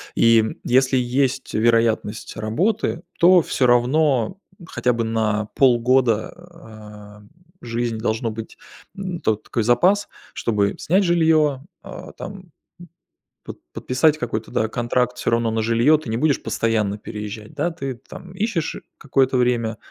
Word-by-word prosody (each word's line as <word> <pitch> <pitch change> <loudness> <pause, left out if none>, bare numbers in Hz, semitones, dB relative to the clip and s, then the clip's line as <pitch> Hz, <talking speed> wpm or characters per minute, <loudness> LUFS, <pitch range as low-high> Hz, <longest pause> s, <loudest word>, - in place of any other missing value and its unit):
И 115 -1 +5 0.2
если 130 +1 +2
есть 130 +2 -1
вероятность 115 -1 +1
работы, 170 - -1 0.2
то 180 0 +6
всё 130 - 0
равно 125 +2 +2 0.3
хотя 125 -1 0
бы 115 0 -1
на 110 -1 -1
полгода, 120 -3 +3 0.2
а, 105 -7 -13 0.4
жизнь 115 -1 -3
должно 110 +1 -1
быть, 110 0 -8 0.4
м, 185 -3 -5
то 110 - +1
такой 110 +1 -4
запас, 185 - +3 0.3
чтобы 100 -3 0
снять 190 +5 +2
жилье, 160 -5 +2 0.2
а, - - -10
там, - - -8
м, 185 -3 -14 0.9
под - - -10
подписать 150 +4 +1
какой-то, 115 -4 -4
да, 110 - 0
контракт 125 +1 -1
всё - - -2
равно 115 -1 +1
на 110 0 -1
жилье. 115 +7 +3
Ты 145 -7 -9
не 110 - -1
будешь 150 +1 +1
постоянно 110 -2 -1
переезжать, 105 0 -8
да. 155 +4 -1
Ты 135 -6 -5
там 175 +8 -13
ищешь 190 -5 -2 0.2
какое-то 135 -2 +1
время, 115 -3 0
120 Hz, 140 wpm, -21 LUFS, 110-150 Hz, 0.9 s, то